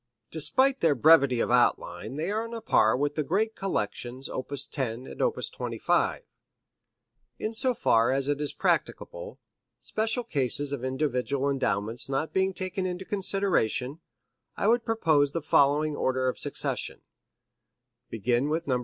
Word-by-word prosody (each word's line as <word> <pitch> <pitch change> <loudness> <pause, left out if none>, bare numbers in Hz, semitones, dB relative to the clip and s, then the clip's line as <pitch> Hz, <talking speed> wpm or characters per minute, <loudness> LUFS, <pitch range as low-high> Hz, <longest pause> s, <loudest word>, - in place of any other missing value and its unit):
Despite 260 - +3
their 160 -4 +3
brevity 140 -2 +5
of - - -1
outline 120 -4 +1
they 160 +6 -2
are 220 +2 -1
on 230 0 -7
a 230 - -6
par 110 - +3
with 145 +2 0
the 155 - -1
great 215 +8 0
collections 130 - -4
op. 130 - -5
10 130 -3 -2
and - - -8
op. - - +2
25. - - -1 1.1
In 215 - -3
so 250 +2 +1
far 115 - +3
as 135 0 0
it 145 0 -1
is 145 - -1
practicable - - -2 0.4
special 225 +3 -1
cases 145 - -1
of 130 -3 -4
individual 135 0 -1
endowments 115 -2 -2
not 135 +4 -2
being 190 0 +2
taken 185 0 -2
into 180 +1 -5
consideration 185 - 0 0.6
I - - -1
would 230 +2 +3
propose 155 -11 +2
the 165 - -2
following 150 +1 +3
order 130 -1 0
of 130 - 0
succession: - - -3 1.1
Begin 120 +5 0
with 165 +2 -1
Nos. 130 -3 0
145 Hz, 150 wpm, -27 LUFS, 130-195 Hz, 1.1 s, brevity